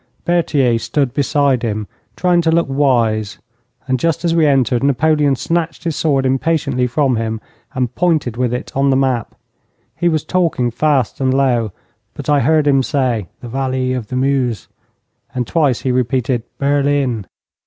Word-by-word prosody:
Berthier 145 -9 +2
stood 120 +3 -1
beside 140 -3 +1
him, 110 -2 -2 0.3
trying 180 -1 +2
to 165 - +1
look 170 +1 +3
wise, 115 -6 +1 0.5
and 130 -1 0
just 165 +2 0
as 165 - +2
we 165 -2 +3
entered, 130 -3 +2
Napoleon 145 +1 +2
snatched 165 +4 -2
his 165 -3 -2
sword 140 -5 +1
impatiently 135 -1 0
from 130 -1 +1
him 110 0 -2 0.4
and 125 -2 -1
pointed 155 -9 0
with 125 -1 0
it 125 - -4
on 140 +1 +2
the 135 - +3
map. 130 -3 0 0.6
He 175 +1 +1
was 155 -3 0
talking 165 -9 0
fast 135 0 0
and 130 -1 +2
low, 125 -5 +1 0.4
but - - -6
I 145 - +4
heard 155 +1 +2
him 135 -2 +4
say, 125 - -1
'The 120 - -8
valley 130 0 -1
of 125 -4 -4
the 130 - -5
Meuse,' 130 -3 0 0.7
and 125 -1 -1
twice 145 -3 +1
he 130 - 0
repeated 125 0 0 0.2
'Berlin.' 140 -6 0
135 Hz, 165 wpm, -17 LUFS, 125-150 Hz, 0.7 s, I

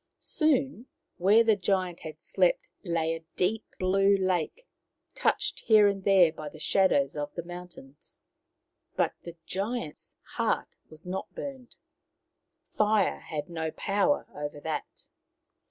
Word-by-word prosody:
Soon 275 -4 0 0.3
where 200 +5 +5
the 220 -2 +4
giant 185 -3 0
had 155 -1 -9
slept - - +1
lay 165 -3 0
a 165 0 -7
deep 210 +5 0
blue 195 +2 +3
lake, 185 - -1 0.5
touched - - 0
here 215 -2 +6
and 195 -1 -1
there 185 -4 +6
by 155 -1 -7
the 155 - -13
shadows 155 -4 +2
of 145 0 -3
the 170 - -4
mountains. 175 -5 -11 0.8
But - - +1
the 170 -1 -9
giant's 200 -3 -4
heart - - -2
was 155 +2 -9
not 185 +2 -5
burnt. 265 -3 -7 1.0
Fire 215 0 +2
had 150 -2 -5
no 160 -2 -3
power 205 - +1
over 145 0 -5
that. 155 0 -5
185 Hz, 130 wpm, -28 LUFS, 160-215 Hz, 1.0 s, here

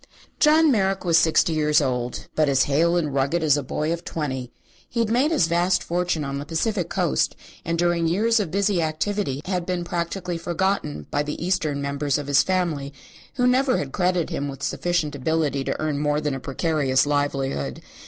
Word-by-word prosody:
John 310 0 +5
Merrick 195 -4 +1
was 165 -2 +5
sixty 160 0 +3
years 150 -1 +3
old, 125 -4 -2
but 155 -2 +2
as 135 -1 +4
hale 165 +5 +2
and 150 -5 -1
rugged 140 +5 0
as 150 -3 +4
a 145 - -1
boy 155 +4 -2
of 170 - -6
twenty. 130 -6 -4 0.4
He 235 - -3
had 225 -1 +1
made 255 +6 +3
his 320 - +3
vast 175 +2 +1
fortune 175 -2 -1
on 140 0 -3
the - - -4
Pacific 180 +2 -1
Coast 65 - 0 0.3
and 170 +1 -1
during 175 -1 +1
his 165 - +1
years 225 +5 +2
of 195 -6 -1
busy 195 0 +1
activity 155 -2 -2
had 180 -2 -1
been 180 0 -2
practically 175 0 -3
forgotten 170 - -1
by 145 - +1
the 150 0 -4
Eastern 155 -6 0
members 140 0 -1
of 145 - -5
his 140 -1 +4
family, 165 -5 -1 0.4
who 250 -2 +1
never 255 +1 +3
had 135 -2 -4
credited 180 -1 0
him 140 - -2
with 135 - -8
sufficient 175 -4 -1
ability 145 0 0
to - - -2
earn 155 -2 -1
more 150 0 +1
than 150 -2 -2
a 135 - -4
precarious 140 -1 +1
livelihood. 135 - -1
160 Hz, 195 wpm, -23 LUFS, 140-180 Hz, 0.4 s, John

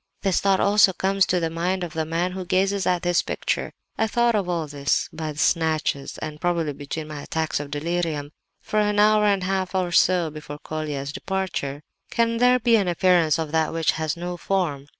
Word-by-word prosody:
This 195 -2 +2
thought 195 -1 +3
also 200 -1 +5
comes 195 +1 +2
into 180 - +1
the 165 -1 -2
mind 180 +3 -1
of 170 -3 -5
the 160 -1 -2
man 170 +3 -1
who 185 0 -5
gazes 190 +2 +1
at 180 -1 +1
this 175 -1 +2
picture. - - -2 0.3
I 220 - +2
thought 235 +1 +2
of 200 -4 0
all 170 -3 -1
this 145 -1 -1
by 155 -1 -4
snatches 155 -2 0 0.2
probably 170 -3 0
between 145 +3 -6
my 150 -2 -7
attacks 160 +1 -2
of 145 -1 -6
delirium—for 160 +4 -3
an 210 0 +1
hour 210 0 +5
and 200 -2 +2
a - - -2
half 190 0 -1
or 180 -2 0
so 175 -2 +3
before 150 -1 -8
Colia's 150 -2 -5
departure. 185 -7 -3 0.3
"Can 230 0 +1
there 250 +1 +5
be 235 -1 +3
an 200 -3 0
appearance 175 -3 +3
of 160 -2 -3
that 160 -1 +1
which 165 -1 +2
has 160 0 -3
no 175 +1 -4
form? 170 -7 -1
175 Hz, 195 wpm, -24 LUFS, 155-190 Hz, 0.3 s, also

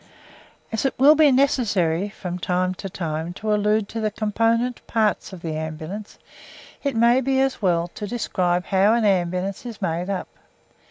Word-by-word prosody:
As 225 - -1
it 270 - -1
will 280 +4 +7
be 310 -2 +5
necessary 205 - +2
from 180 -3 -6
time 180 +1 0
to 195 +1 -7
time 165 -1 -4
to 215 +3 -2
allude 210 0 +1
to 230 - -4
the 215 - +1
component 230 +3 0
parts 220 -3 0
of 185 -3 -10
the 160 -2 -3
Ambulance, 160 +6 -6 0.6
it 280 -3 -2
may 235 +3 +4
be 265 +1 +1
as 270 -3 0
well 175 -3 +1
to 205 +4 -7
describe 180 -6 -1
how 200 +3 +3
an 235 -2 +1
ambulance 185 0 0
is 235 -4 -8
made 170 +3 -2
up. 195 -2 -3
205 Hz, 170 wpm, -23 LUFS, 180-230 Hz, 0.6 s, will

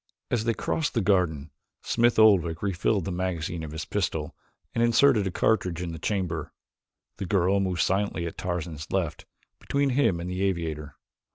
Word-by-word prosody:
As 115 -2 0
they 115 -1 +1
crossed 160 -4 -1
the 115 - +2
garden, 85 -7 +1 0.3
Smith 120 0 +2
Oldwick 90 -7 +4
refilled 100 0 0
the 95 - -3
magazine 85 -2 -2
of 80 - -6
his 80 0 -5
pistol - - -2 0.4
and 115 - +1
inserted 120 -2 +4
a - - 0
cartridge 90 -4 +1
in 90 -1 -4
the 80 - -7
chamber. 90 -5 -2 0.7
The 95 - -4
girl 95 0 +2
moved 90 -3 0
silently 95 -2 0
at 85 - -5
Tarzan's 85 -3 -4
left, 85 -5 -2 0.3
between 140 -1 0
him 125 -10 +2
and 85 - -5
the 90 +1 -3
aviator. 80 -6 -2
90 Hz, 170 wpm, -27 LUFS, 85-105 Hz, 0.7 s, Oldwick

